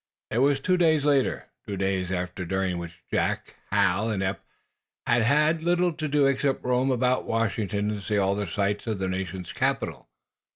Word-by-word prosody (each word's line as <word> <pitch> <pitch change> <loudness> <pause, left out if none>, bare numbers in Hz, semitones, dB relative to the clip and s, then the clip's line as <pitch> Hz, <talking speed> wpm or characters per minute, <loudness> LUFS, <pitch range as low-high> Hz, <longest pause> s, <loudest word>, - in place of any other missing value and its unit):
It 115 - +1
was 140 +1 +3
two 185 +6 +2
days 160 -4 +3
later; 140 -3 +2 0.2
two 100 - -3
days 95 -1 -1 0.2
during 95 -1 -1
which 85 -1 -9
Jack, - - -1 0.2
Hal 100 +2 +2
and 100 -3 -1
Eph 95 -2 -1 0.7
had 120 0 +3
had 150 +7 +3
little 175 +1 +2
to 155 0 -3
do 145 -1 +3
except 135 0 +1
roam 125 +1 +2
about 125 0 +1
Washington 105 -2 -1
and 105 -1 -4
see 105 +1 -1
all 100 -1 +2
the 100 0 -2
sights 100 +4 -1
of 110 -2 -1
the 95 0 -2
National 95 0 -3
Capital. - - -2
110 Hz, 175 wpm, -26 LUFS, 95-140 Hz, 0.7 s, was